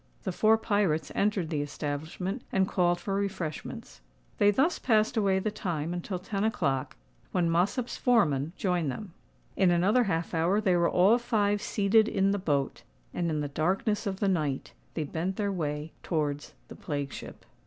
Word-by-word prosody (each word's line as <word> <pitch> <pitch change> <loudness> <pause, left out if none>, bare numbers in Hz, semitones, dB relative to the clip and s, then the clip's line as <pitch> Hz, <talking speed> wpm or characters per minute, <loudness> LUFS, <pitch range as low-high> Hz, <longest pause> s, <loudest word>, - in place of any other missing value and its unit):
The 190 - -2
four 220 +5 +4
pirates 205 -8 0
entered 200 -5 0
the 150 -2 0
establishment, 155 - -4
and 190 -1 +2
called 175 -2 +1
for 195 - -3
refreshments. 190 - -4 0.4
They 205 - +6
thus 275 - +2
passed 220 -1 +2
away 200 -4 +2
the 210 +3 -1
time 170 -5 -3
until 180 +2 -3
ten 195 +2 -3
o'clock, 140 -12 0 0.4
when 170 -2 +1
Mossop's 205 +9 0
foreman 160 - +2
joined 180 -6 0
them. 185 +6 -6 0.4
In 190 - +4
another 195 +8 +3
half 165 -4 -2
hour 170 +5 +2
they 190 -4 +2
were 170 -1 +3
all 200 +7 +4
five 205 -4 +1
seated 215 +2 +3
in 195 -2 +2
the 200 - 0
boat; 145 -7 -1 0.3
and, 170 -1 -1
in 155 -2 -1
the 145 - -2
darkness 190 +9 0
of 190 -1 -3
the 200 - +1
night, 150 -8 -1 0.2
they 160 - -1
bent 170 +6 -3
their 200 -1 -1
way 150 -3 -3
towards 150 -3 -2
the - - -10
plague 145 -3 -4
ship. - - -9
185 Hz, 175 wpm, -29 LUFS, 160-205 Hz, 0.4 s, They